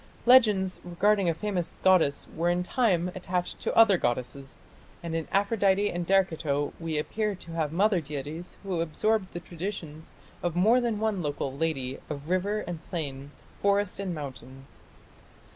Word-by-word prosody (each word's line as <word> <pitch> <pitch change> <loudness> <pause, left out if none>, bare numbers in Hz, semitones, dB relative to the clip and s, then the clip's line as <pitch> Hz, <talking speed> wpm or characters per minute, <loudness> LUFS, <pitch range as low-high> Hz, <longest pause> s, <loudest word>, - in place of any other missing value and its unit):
Legends 210 -7 +5
regarding 190 +2 +2
a - - +2
famous 185 -2 -3
goddess 170 -7 +4
were 170 +2 +1
in 175 +1 +1
time 180 -5 +1
attached 180 -1 -3
to - - -2
other 215 -5 +7
goddesses, 130 +3 -3 0.5
and 170 -1 -4
in 165 -1 -2
Aphrodite 200 0 +2
and 175 -1 -3
Derceto 160 -7 +1
we 165 -2 -2
appear 210 +7 -1
to 170 -2 -11
have 160 -3 -1
mother 190 +1 +2
deities 150 +4 -7
who 185 -4 -1
absorbed 190 +5 0
the 175 - -5
traditions 170 -3 -6 0.3
of 175 -2 -2
more 220 +8 +4
than 235 -3 0
one 215 -4 0
local 145 -3 -3
"lady" 135 -4 -2
of 150 +1 -6
river 200 +4 0
and 175 -4 -6
plain, 140 -5 -4 0.3
forest 200 -1 +1
and 190 -3 -3
mountain. 135 -2 -8
175 Hz, 155 wpm, -28 LUFS, 155-200 Hz, 0.5 s, other